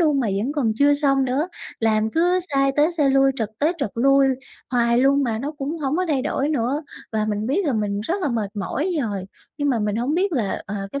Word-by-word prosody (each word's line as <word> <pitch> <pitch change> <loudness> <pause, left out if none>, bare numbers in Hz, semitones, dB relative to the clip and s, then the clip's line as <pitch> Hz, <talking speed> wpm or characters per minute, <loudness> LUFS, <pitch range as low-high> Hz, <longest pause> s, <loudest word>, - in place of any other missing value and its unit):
luôn 300 -5 +3
mà 240 - 0 0.2
vẫn 275 +5 -2
còn 280 -7 0
chưa 285 0 +5
xong 275 -2 +2
nữa, 275 +7 0 0.3
làm 220 0 +2
cứ 355 +5 +2
sai 275 0 +3
tới 305 +4 +3
sai 295 -5 +2
lui, 270 0 +4
trật 220 -4 -1
tới 310 +4 +2
trật 245 -8 -2
lui 275 +3 +4 0.4
hoài 235 -1 +2
luôn 275 +2 +4
mà 230 -4 -1
nó 285 +6 -4
cũng 295 +4 -3
hổng 285 +1 -1
có 370 - +1
thay 270 -4 +1
đổi 280 +2 -1
nữa. 280 +1 0 0.3
Và 215 -1 0
mình 210 +1 -2
biết 345 +9 +1
là 275 - +1
mình 205 -2 -1
rất 325 - -1
là 295 - +1
mệt 220 -5 -2
mỏi 295 - -2
rồi, 200 -4 -3 0.3
nhưng 290 0 0
mà 245 -4 +2
mình 210 0 -1
hổng 255 +6 0
biết 380 +2 +1
là, 225 -9 -1
ờ, 205 - -5 0.2
cái 280 - -3
270 Hz, 245 wpm, -22 LUFS, 225-295 Hz, 0.4 s, chưa